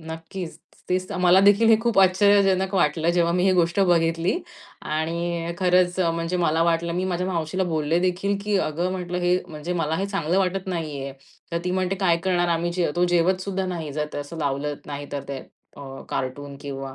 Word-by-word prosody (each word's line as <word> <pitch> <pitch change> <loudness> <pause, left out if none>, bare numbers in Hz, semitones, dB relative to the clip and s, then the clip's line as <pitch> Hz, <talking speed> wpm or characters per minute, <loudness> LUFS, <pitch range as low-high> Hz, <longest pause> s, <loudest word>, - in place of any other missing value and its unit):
नक्कीच. 165 +2 -7 0.3
तेच 185 0 -1
तर. 195 - -3
मला 180 +1 +5
देखील 205 +3 +5
हे 225 - +7
खूप 235 -4 +1
आश्चर्यजनक 190 0 +4
वाटलं, 160 -1 +2
जेव्हा 170 -1 +2
मी 180 +1 +1
ही 190 - +4
गोष्ट 175 +1 +2
बघितली 170 - +2 0.4
आणि 165 +2 -2
अ, 170 - -3
खरंच 180 -1 +2
म्हणजे 165 0 0
मला 165 -1 +2
वाटलं, 170 0 +1
मी 180 +2 -1
माझ्या 180 0 -1
मावशीला 180 +1 -1
बोलले 160 -1 0
देखील, 185 +2 0
की 210 -1 +1
अगं 175 +2 -1
म्हंटलं, 180 -1 -3
"हे 180 0 +2
म्हणजे 155 +3 -5
मला 160 -2 -1
हे 195 - -1
चांगलं 190 -3 0
वाटत 190 0 -1
नाहीये." 150 -6 -4 0.4
तर 170 - +1
ती 180 - -1
म्हणते, 185 +1 0
"काय 180 -3 +2
करणार 175 -2 +1
आम्ही? 170 +1 0
जे 175 -3 0
तो 175 - +3
जेवत 180 +2 +2
सुद्धा 190 -1 -2
नाही. 165 -5 -4
जर 150 +1 -2
ते - - -4
असं 145 +3 -7
लावलं 145 0 -1
नाही 145 0 -6
तर 140 -1 -3
ते 140 -1 -4 0.4
अ, - - -10 0.3
कार्टून 140 +2 -4
किंवा 135 -1 -6
175 Hz, 200 wpm, -24 LUFS, 160-185 Hz, 0.4 s, हे